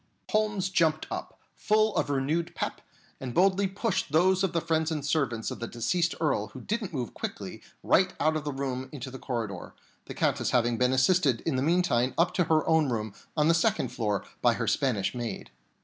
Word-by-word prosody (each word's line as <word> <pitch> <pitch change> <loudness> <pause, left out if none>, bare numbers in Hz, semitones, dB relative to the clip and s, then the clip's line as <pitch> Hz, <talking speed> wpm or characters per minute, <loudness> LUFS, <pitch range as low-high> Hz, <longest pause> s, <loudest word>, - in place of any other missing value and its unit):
And - - -20
Holmes 210 -3 +1
jumped 160 -4 +2
up, - - -6 0.2
full 215 0 +2
of - - 0
renewed 150 +5 -1
"pep," - - -3 0.4
and 125 -2 -6
boldly 195 +2 +3
pushed 190 - -2
those 185 +4 +3
of 190 - +1
the 170 - +1
friends 160 -1 0
and 150 -3 -3
servants 135 -7 0
of - - -6
the 115 - -4
deceased 170 +10 0
Earl 135 -10 0
who 130 - -11
didn't 215 -2 -3
move 125 -7 -4
quickly - - -6 0.2
right 185 0 +4
out 155 +2 +2
of 155 - -2
the 150 - -3
room 130 -1 -4
into 135 -3 -7
the 130 - -8
corridor, 110 -8 -4 0.3
the - - -8
Countess - - +1
having 120 -2 +1
been 125 0 +3
assisted 130 -1 +3
in - - -1
the 130 - 0
meantime 155 -6 +2
up 170 +1 +3
to 180 - +2
her 155 -1 +2
own 160 -3 +3
room 110 -3 -2 0.2
on 150 0 +3
the 165 - +5
second 205 +6 +1
floor 105 -4 -2 0.2
by - - +4
her - - -2
Spanish 120 -8 0
maid. 120 -2 -5
155 Hz, 205 wpm, -28 LUFS, 125-180 Hz, 0.4 s, the